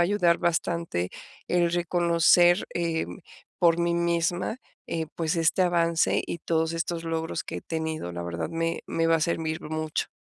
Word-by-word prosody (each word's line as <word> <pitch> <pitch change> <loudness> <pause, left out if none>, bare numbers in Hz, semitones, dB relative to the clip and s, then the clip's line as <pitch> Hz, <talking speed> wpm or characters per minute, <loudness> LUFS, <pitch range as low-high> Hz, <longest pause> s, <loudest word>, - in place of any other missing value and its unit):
ayudar 175 -2 +3
bastante, 170 - -1 0.4
el 175 -1 +2
reconocer, 175 +1 +4
em, 165 - -2 0.4
por 170 -1 +4
mí 170 0 +1
misma, 170 +3 0 0.3
eh, 160 -1 -2
pues, 165 +1 0
este 165 +3 +3
avance, 170 -2 +2
y - - -4
todos 160 0 0
estos 165 0 -2
logros 165 0 -2
que - - -6
he - - -5
tenido. 160 - -3
La 85 0 -5
verdad, 85 -1 -4
me 165 0 -1
me 165 0 0
va 165 0 +4
a - - -3
servir 160 -1 -1
mucho. 155 0 -2
165 Hz, 160 wpm, -26 LUFS, 160-170 Hz, 0.4 s, reconocer